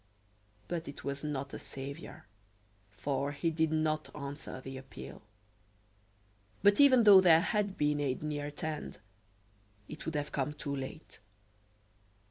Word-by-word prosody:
But 170 -2 -3
it 140 - -8
was 140 +1 -4
not 140 -2 -3
a - - -5
saviour, 135 -2 -7 0.6
for 135 +8 -2
he 165 +3 0
did 160 0 +1
not 155 -1 0
answer 140 -2 -6
the 135 +1 -8
appeal. 70 - -10 1.4
But 205 0 +5
even 260 -4 +7
though 200 -3 +9
there 165 -3 +7
had 205 0 0
been 150 0 +1
aid 140 -1 -1
near 145 -1 -2
at 145 - -8
hand, 155 -1 -4 0.9
it 155 - -8
would 160 - -2
have 145 0 -2
come 140 +1 -1
too 140 -1 -4
late. 135 +4 -7
150 Hz, 140 wpm, -32 LUFS, 140-160 Hz, 1.4 s, though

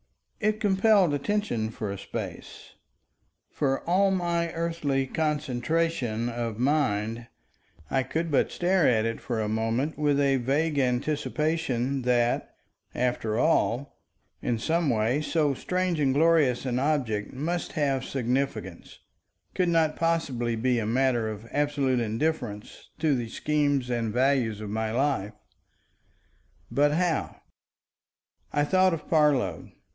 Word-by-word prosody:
It 215 0 0
compelled 195 -4 +3
attention 145 - -1
for 110 -3 -5
a 100 - -5
space. - - -7 0.8
For 135 -2 0
all 190 +3 +3
my 170 -3 0
earthly 165 -5 -1
concentration 150 -4 -1
of 115 -2 -3
mind, 115 -4 0 0.6
I 135 - +2
could 160 +5 -3
but 140 - +2
stare 180 -1 +2
at 110 -3 +3
it 115 0 -3
for 120 -3 -3
a 110 - -1
moment 115 +8 -1
with 145 -1 +2
a 140 -1 +3
vague 145 +4 0
anticipation 140 0 0
that, 120 -1 +1 0.4
after 120 -3 -1
all, 140 -2 +1 0.4
in 120 -2 0
some 160 +6 0
way 115 +4 +1
so 150 -2 +1
strange 180 +3 -1
and 135 -2 +2
glorious 150 -5 +3
an 125 -1 0
object 130 -8 0
must 165 +6 -3
have 140 -3 0
significance, 125 -8 -3 0.6
could 180 -2 +1
not 160 -2 +2
possibly 135 -9 0
be 120 +1 +1
a 105 - -2
matter 120 -1 +1
of 110 +1 -7
absolute 145 -3 +1
indifference 115 -2 -3
to 155 -1 +2
the 120 -3 -3
scheme 145 +1 0
and 115 -2 -1
values 125 -3 +1
of 105 -1 -5
my 110 0 -1
life. 120 -5 0 1.4
But 145 +1 +3
how? 170 -1 -1 1.1
I 145 - +1
thought 185 +3 +3
of 155 - -11
Parload. 140 - +1
135 Hz, 130 wpm, -27 LUFS, 120-160 Hz, 1.4 s, compelled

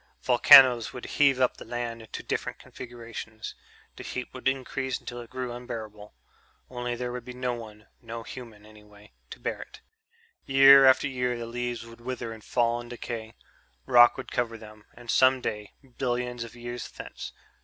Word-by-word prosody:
Volcanoes 125 -4 +7
would 125 - -8
heave 140 -3 +3
up 130 - +2
the - - -9
land 120 0 -5
into 110 - -8
different - - -3
configurations. 115 -2 -9 0.4
The - - -8
heat 125 - -6
would 130 0 -4
increase 130 0 -2
until 120 0 -7
it 120 - -12
grew 125 -1 -5
unbearable... 110 -4 -8 0.6
only 120 -1 -3
there 125 0 -4
would 125 -1 -6
be 125 - -9
no 125 -1 -2
one 110 -3 -10 0.2
no 115 0 -7
human, 115 -4 -10
anyway 105 -1 -17 0.2
to - - -10
bear - - -4
it. - - -12 0.6
Year 135 0 +8
after 130 +2 +5
year 125 -2 -1
the 120 - -5
leaves 120 0 -4
would 115 0 -14
wither 120 -2 -5
and 110 -1 -13
fall 120 -1 0
and 120 - -12
decay. 115 -2 -6 0.5
Rock 120 -2 +6
would - - -8
cover 115 -2 -1
them. 110 -1 -14
And 120 -1 -5
some 130 0 +5
day... 105 -4 -5 0.3
billions 125 -1 -2
of 115 0 -11
years 120 0 -6
thence - - -9
120 Hz, 175 wpm, -27 LUFS, 115-125 Hz, 0.6 s, Year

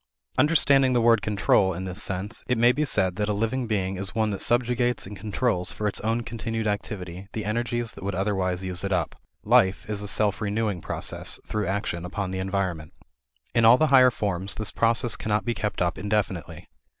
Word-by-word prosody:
Understanding 140 -4 +4
the 120 - +3
word 115 -2 +4
"control" 95 -1 +2
in 95 +2 -5
this 95 +2 -5
sense, 95 +3 -3
it 125 - +1
may 120 +2 +5
be 150 +4 0
said 95 -8 0
that 105 0 -1
a - - +1
living 115 +4 -1
being 95 -3 -1
is 95 +1 -5
one 110 -1 +1
that 100 - -3
subjugates 120 0 +1
and 100 +2 -8
controls 105 -3 -1
for 105 - -3
its 105 - -3
own 115 +2 0
continued 115 -1 -4
activity 100 -3 -4
the 110 - -4
energies 120 +1 -1
that - - -11
would 100 0 -2
otherwise 95 -2 -1
use 90 -1 -3
it 100 - -2
up. 85 -4 -1 0.3
Life 95 +1 +3
is 105 -1 -3
a 105 - -4
self 105 0 +1
renewing 105 -3 -1
process - - -3
through 105 -2 -2
action 95 -3 -2
upon 95 +1 -4
the 95 - -3
environment. 95 -5 -2 0.6
In 115 - +3
all 115 +2 +8
the 155 +1 +2
higher 130 -1 +8
forms 100 -5 -2
this 110 -1 -3
process 115 0 +2
cannot 105 0 -1
be 120 - 0
kept 105 -4 -2
up 85 - -1
indefinitely. 100 -4 -2
105 Hz, 200 wpm, -25 LUFS, 95-115 Hz, 0.6 s, all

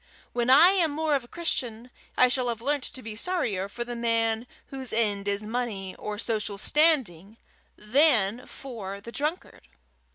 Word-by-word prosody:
When 240 0 0
I 300 +7 +8
am 370 -4 +2
more 305 +1 -1
of 275 -3 +1
a - - -15
Christian, 250 -7 -3 0.3
I 255 - +6
shall 250 0 0
have 230 -1 -2
learnt 280 +3 0
to 260 - -8
be 220 -1 -7
sorrier 215 - -2
for 240 +4 -4
the 240 0 -6
man 230 0 0 0.2
whose 265 -2 -5
end 205 -3 0
is 200 +1 0
money 215 -4 -3
or 210 0 -6
social 215 -2 -2
standing 225 - +2 0.4
than 235 -2 +2
for 210 -7 -7
the 230 +3 -10
drunkard. 300 - -4
235 Hz, 165 wpm, -27 LUFS, 210-275 Hz, 0.4 s, I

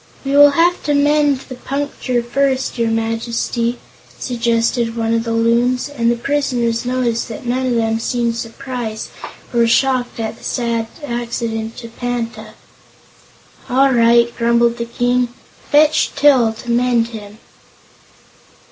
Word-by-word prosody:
"We 275 - -2
will 290 0 +8
have 350 +1 +3
to 295 -1 +1
mend 290 -1 +2
the 265 - -10
puncture 260 -2 -3
first, 265 +1 -1
your 230 -1 +1
Majesty," 230 +1 -1 0.4
suggested 235 -1 0
one 225 0 0
of 230 0 0
the 230 - -2
Loons, 235 +3 +1
and 235 -5 0
the 240 - +2
prisoners 240 -3 -1
noticed 245 -2 -1
that 225 +2 -8
none 255 +2 -1
of 245 - 0
them 225 -1 0
seemed 235 0 -1
surprised 235 -1 -5 0.4
or 235 -1 +3
shocked 250 0 +1
at 225 0 -4
the - - -18
sad 235 -2 -1 0.2
accident 230 -2 -4
to 230 - -8
Panta. 240 0 -5 1.1
"All 270 +2 +4
right," 235 0 +4
grumbled 235 0 +2
the 235 - -3
King. 245 +1 0 0.4
"Fetch 300 +1 +4
Til 265 -6 +4
to 230 +2 -6
mend 240 -1 +2
him." 210 -2 -10
235 Hz, 140 wpm, -18 LUFS, 230-255 Hz, 1.1 s, will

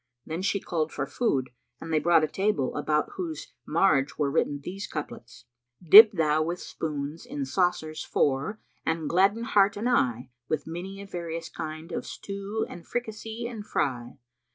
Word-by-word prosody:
Then 160 +3 -4
she 195 +1 +1
called 160 -4 -2
for 135 - -2
food 135 - -1 0.3
and 165 0 -6
they 155 - +4
brought 165 +1 +4
a - - +2
table, 190 -7 0
about 150 +1 0
whose 165 -4 -5
marge 150 -4 +2
were 145 -2 +1
written 145 -1 0
these 195 +7 -6
couplets,[FN#328] 120 0 -10
"Dip 215 +1 +12
thou 155 -3 +2
with 170 +3 -2
spoons 150 0 -5
in 275 +3 -4
saucers 175 -7 0
four 145 +10 0 0.2
and 160 -1 -1
gladden 195 +7 +3
heart 205 -3 +3
and 220 +4 -1
eye 125 - +1
* 120 - -51
With 155 -2 -1
many 190 +4 -6
a - - -9
various 170 -3 -5
kind 155 +2 -7
of - - -4
stew 200 +2 -4
and 175 - -11
fricassee 225 0 -4
and 235 -3 -5
fry. 125 -11 -2
165 Hz, 170 wpm, -27 LUFS, 145-200 Hz, 0.3 s, Dip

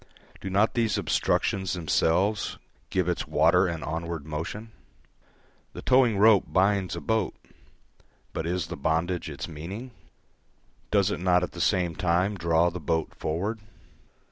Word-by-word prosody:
Do 95 - -5
not 100 +4 +2
these 115 -3 +1
obstructions 95 -2 0
themselves 90 +4 +1 0.3
give 95 -2 0
its 90 - -1
water 85 +5 +4
an 85 -2 -4
onward 80 -1 -4
motion? 85 +9 -5 1.0
The - - -8
towing 125 -5 +4
rope 105 -1 +6
binds 95 -1 +1
a - - -4
boat, 110 -5 0 1.0
but 80 - -3
is 90 -1 -1
the 85 +2 -6
bondage 80 +4 -1
its 70 - -6
meaning? 90 +11 -7 1.0
Does 100 -1 +2
it - - -3
not 90 0 +3
at - - -3
the 85 - -6
same 90 -3 +1
time 90 +2 +1
draw 85 -1 +2
the 90 - -6
boat 80 +1 -1
forward? 100 +9 -3
90 Hz, 140 wpm, -27 LUFS, 80-100 Hz, 1.0 s, rope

